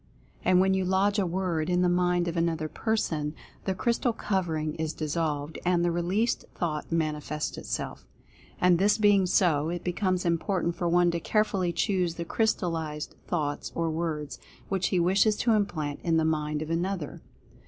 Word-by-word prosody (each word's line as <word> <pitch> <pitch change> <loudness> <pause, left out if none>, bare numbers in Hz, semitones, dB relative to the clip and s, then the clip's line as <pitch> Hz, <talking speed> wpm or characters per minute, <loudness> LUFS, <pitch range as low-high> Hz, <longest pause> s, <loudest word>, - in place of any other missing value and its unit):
And 180 - +4
when 190 +1 +4
you 190 0 +1
lodge 195 +3 +2
a 190 - +1
Word 175 -3 -1
in 180 0 +2
the - - +4
mind 175 0 +2
of 170 - -2
another 165 -2 0
person, 155 -7 -1 0.3
the 190 - 0
crystal 235 +3 +1
covering 165 -8 -1
is 160 -1 -2
dissolved, 155 -1 -2
and 175 -1 +2
the 175 - +2
released 185 +8 0
thought 155 -3 -3
manifests 150 -2 -2
itself. - - -5 0.5
And, 180 -1 +4
this 205 +2 +4
being 205 -3 +4
so, 165 -5 +2
it 175 0 -4
becomes 185 0 0
important 170 +1 0
for 175 -3 -1
one 175 0 +4
to 170 - -2
carefully 195 -2 +1
choose 180 -3 0
the 170 - -4
crystallized 165 -8 -1
thoughts, 150 -5 -2
or 165 -1 0
words, 155 -3 -3 0.3
which 195 -1 +1
he 185 - +1
wishes 195 +5 +3
to 235 - +1
implant 160 -9 -1
in 165 -2 +1
the 160 - +2
mind 150 -1 0
of 155 - -6
another. 175 -2 -2
175 Hz, 170 wpm, -28 LUFS, 160-190 Hz, 0.5 s, And